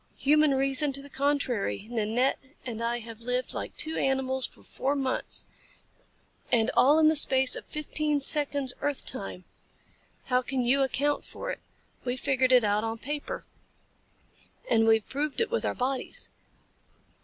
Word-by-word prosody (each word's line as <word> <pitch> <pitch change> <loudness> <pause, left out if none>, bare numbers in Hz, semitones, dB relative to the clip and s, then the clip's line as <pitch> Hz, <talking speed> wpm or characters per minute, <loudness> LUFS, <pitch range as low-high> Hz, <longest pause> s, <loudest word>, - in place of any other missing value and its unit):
Human 300 0 +4
reason 275 +2 +3
to 275 - -3
the 285 - -13
contrary, 260 - -1
Nanette 235 +3 +1 0.3
and 230 -3 -5
I 235 +1 0
have 225 0 -10
lived 250 +2 -2
like - - -6
two 315 +1 -2
animals 265 -1 0
for - - -21
four 275 +2 -2
months, 265 -2 0 1.1
and 225 -2 +3
all 290 +4 +6
in 315 -1 +5
the 315 - +4
space 265 -3 +5
of - - -8
fifteen 300 0 -1
seconds 285 -2 +1
earth 290 -2 -1
time. 195 -6 -4 0.8
How 250 -1 +2
can 255 0 -2
you 270 +3 +3
account 285 +2 0
for - - -6
it? - - -6 0.4
We 250 0 -2
figured 260 -1 +1
it 250 -2 +6
out 210 +1 +1
on 225 0 -3
paper. 295 - -5 1.2
And 225 - +3
we've 225 -1 +3
proved 290 +2 -3
it 460 0 0
with 475 - 0
our - - -1
bodies. 260 +1 -2
265 Hz, 155 wpm, -28 LUFS, 245-290 Hz, 1.2 s, all